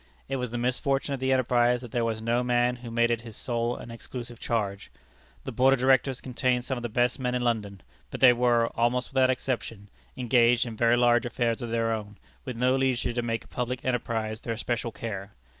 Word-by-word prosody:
It 135 - -2
was 125 -1 -3
the 120 - -4
misfortune 135 +3 0
of 135 - -3
the 130 +1 0
enterprise 125 -1 +3
that 120 -3 -9
there 120 - 0
was 110 -1 -2
no 115 +1 +1
one 125 0 -1
man 120 0 +2
who 120 -1 -9
made 120 +1 +2
it 115 -1 0
his 115 -2 -10
sole 120 -1 -1
and 115 - -9
exclusive 120 0 -8
charge. 105 -4 -2 0.5
The - - -5
Board 135 +1 +4
of - - -8
Directors 130 0 +2
contained 125 -1 0
some 130 - -2
of 120 - -5
the 120 - -3
best 120 +3 +1
men 125 -1 -1
in 125 - -1
London. 105 -5 -1 0.3
But - - -6
they 125 -2 +8
were, 120 -1 +2
almost 120 +2 0
without 130 -1 +4
exception, 120 -5 -3 0.3
engaged 120 -1 +3
in 115 -2 -6
very 120 +2 +3
large 120 -1 +3
affairs 120 0 -1
of 120 - -4
their 115 0 0
own, 105 -2 -6 0.3
with 125 - -5
no 125 +2 +3
leisure 130 -2 0
to 120 - -1
make 115 -1 -2
a - - -19
public 125 0 -4
enterprise 115 -3 -2
their 115 -1 -4
special 120 0 -2
care. 105 -2 -6
120 Hz, 225 wpm, -27 LUFS, 115-125 Hz, 0.5 s, they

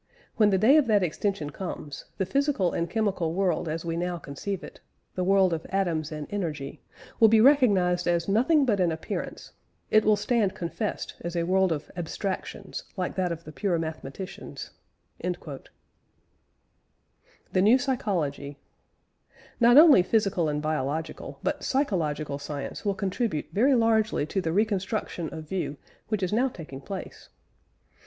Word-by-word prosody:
When 215 -3 +4
the 195 - +3
day 235 +10 +6
of 295 -5 +3
that 210 -3 +3
extension 175 -2 -2
comes, 150 -4 -6
the 190 - 0
physical 275 - +1
and 170 0 -1
chemical 190 -6 -1
world 180 -4 0
as 160 +2 -4
we 165 -1 -2
now 175 +1 -2
conceive 175 +6 -5
it - - -11 0.3
the 185 - -2
world 190 -1 +4
of 160 -1 -3
atoms 170 -6 -1
and 150 -1 -5
energy 155 -9 -4 0.4
will 225 - +8
be 220 0 +5
recognised 200 -10 +4
as 170 -1 +1
nothing 265 +9 +3
but 210 -6 +1
an 175 -2 +2
appearance... 160 0 -5 0.4
it 215 0 +5
will 215 0 +4
stand 210 -1 0
confessed 190 +5 -4
as 170 +1 -5
a 170 - +1
world 190 +1 +2
of 150 -2 -3
abstractions 185 +3 -4
like 180 -1 -2
that 185 -2 -1
of 170 0 -5
the 155 - -10
pure 180 +2 0
mathematicians." 160 +1 -6 0.5
THE 170 -6 -5 1.9
NEW 220 +6 +6
PSYCHOLOGY. 170 - -2 1.0
Not 240 +1 +6
only 300 - +9
physical 185 -5 +1
and 150 0 -2
biological, 155 +1 -3
but - - -2
psychological 155 - -1
science 145 -1 -6
will 200 -2 0
contribute 195 - -2
very 260 +7 +4
largely 220 -7 +2
to 190 +5 -2
the 160 - -1
reconstruction 200 -3 -1
of 155 -1 -8
view 170 -5 -3 0.3
which 215 -3 -1
is 185 - -1
now 245 +5 +3
taking 155 - -9
place. 190 +7 -8
185 Hz, 150 wpm, -27 LUFS, 160-215 Hz, 1.9 s, only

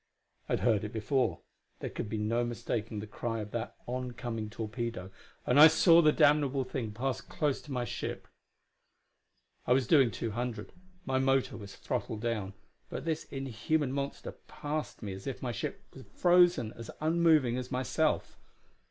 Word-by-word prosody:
I - - 0
had - - 0
heard 110 -4 +3
it 105 - -4
before 125 +4 0 0.4
there - - -5
could 105 - -5
be 110 - -2
no 115 +3 +1
mistaking 115 -2 -3
the - - -6
cry 115 +2 -4
of 105 0 -7
that 115 -1 -4
oncoming 120 -3 -4
torpedo 110 -3 -4 0.3
and 125 +3 +4
I 155 - +12
saw 165 +1 +6
the 155 -2 +5
damnable 145 -3 +3
thing 125 -4 -4
pass 130 +5 -2
close 150 -3 -1
to 150 - -11
my 125 -2 -1
ship. - - -5 1.4
I 125 - +5
was 130 0 +2
doing 135 -2 +5
two 115 +1 -4
hundred 120 +1 -4 0.3
my 130 -1 +1
motor 135 0 +2
was 100 -2 -9
throttled 110 - -3
down 105 -5 -2 0.3
but - - -5
this 160 -1 -1
inhuman 135 +2 -1
monster 140 0 -4 0.2
passed 150 -4 -4
me 100 -2 -4
as 95 +5 -9
if 135 - -5
my 125 - -1
ship 110 - -5
were - - -9
frozen 175 -10 +3
as 115 -1 -9
unmoving 155 -6 +3
as 125 0 -4
myself. 125 -4 0
125 Hz, 170 wpm, -31 LUFS, 110-140 Hz, 1.4 s, I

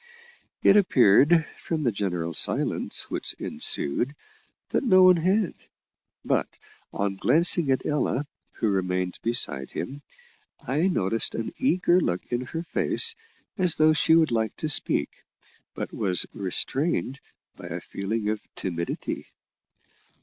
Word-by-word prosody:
It 195 - +6
appeared, 160 - +4
from 160 -2 -3
the 120 - +2
general 90 -5 -3
silence - - 0
which - - -1
ensued 120 - -1 0.6
that - - 0
no 185 -7 +5
one 185 -1 +7
had; 185 +4 +1 0.7
but - - -1 0.3
on 100 -1 -2
glancing 170 - +2
at 130 - 0
Ella, 145 -1 -1 0.3
who 110 - -1
remained 90 -2 -2
beside 75 - 0
him, 140 +2 -6 0.6
I 150 +7 0
noticed 115 - 0
an 115 - -4
eager 185 -8 +2
look 90 - -2
in 120 0 -1
her 165 0 -5
face, 455 - +2 0.5
as 180 -3 +4
though 155 0 +4
she 160 +1 +3
would 160 -4 +3
like 110 -2 -1
to 155 - -3
speak, 145 - +2 0.5
but - - -5
was 95 -5 +1
restrained 135 - -1 0.4
by - - -10
a - - -5
feeling 105 +2 -4
of 110 -1 -2
timidity. 85 -2 -4
130 Hz, 130 wpm, -25 LUFS, 100-165 Hz, 0.7 s, one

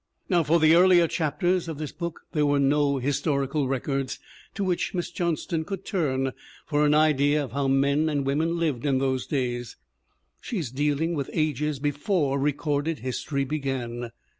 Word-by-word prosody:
Now 175 -3 +4
for 165 +2 +3
the 155 0 +5
earlier 175 -1 +6
chapters 175 +3 0
of 160 -3 -5
this 150 -1 -5
book 170 -2 -6
there 150 -2 +1
were 145 0 +3
no 140 0 +2
historical 140 +1 0
records 135 0 -2 0.4
to 200 - -2
which 185 0 -1
Miss 175 - -2
Johnston 170 -1 -1
could 195 +2 -6
turn 135 -9 0 0.3
for 145 0 +1
an 150 - +4
idea 150 -1 +3
of 135 - -7
how 140 +1 -1
men 140 +3 +2
and 145 -2 -1
women 160 +5 0
lived 155 -8 -1
in 140 -2 +2
those 130 -1 -1
days; 120 -4 -2 0.6
she 230 - -4
is 150 -10 -3
dealing 150 +4 0
with 140 -4 -3
ages 150 -1 0
before 145 +1 0
recorded 145 +2 0
history 140 +2 -2
began. 130 -5 -3
145 Hz, 165 wpm, -26 LUFS, 135-160 Hz, 0.6 s, earlier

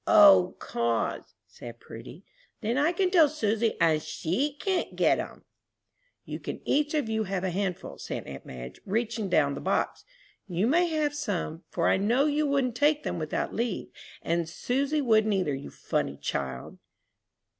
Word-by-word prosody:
"O, 300 - +7
'cause," 115 -1 -2
said 120 0 -11
Prudy, 120 - -11 0.4
"then 225 +2 0
I 295 +4 +3
can 365 +1 +1
tell 325 -5 +6
Susy, 225 -6 0
and 155 -2 +3
she 175 - -1
can 380 -3 -1
get - - +3
'em!" - - -7 0.8
"You - - -5
can - - -6
each 295 +2 +1
of 295 -6 0
you 220 0 0
have 190 -1 -2
a 185 - 0
handful," 185 0 -3
said - - -5
aunt 70 0 -8
Madge, 60 -1 -9
reaching 220 0 -1
down 180 - +3
the - - -6
box. - - -1 0.4
"You 180 +2 0
may 340 +8 +3
have 305 -3 0
some, 195 - -3
for 170 - 0
I - - +4
know 235 +8 +2
you 300 0 +1
wouldn't 275 -3 +1
take 295 +2 +3
them - - -3
without 155 -1 -2
leave, 230 -4 -2 0.3
and 170 0 0
Susy 275 - 0
wouldn't 220 -4 +3
either, 180 -7 0
you 135 +1 -6
funny - - -2
child!" 65 -2 -4
220 Hz, 165 wpm, -28 LUFS, -, 0.8 s, O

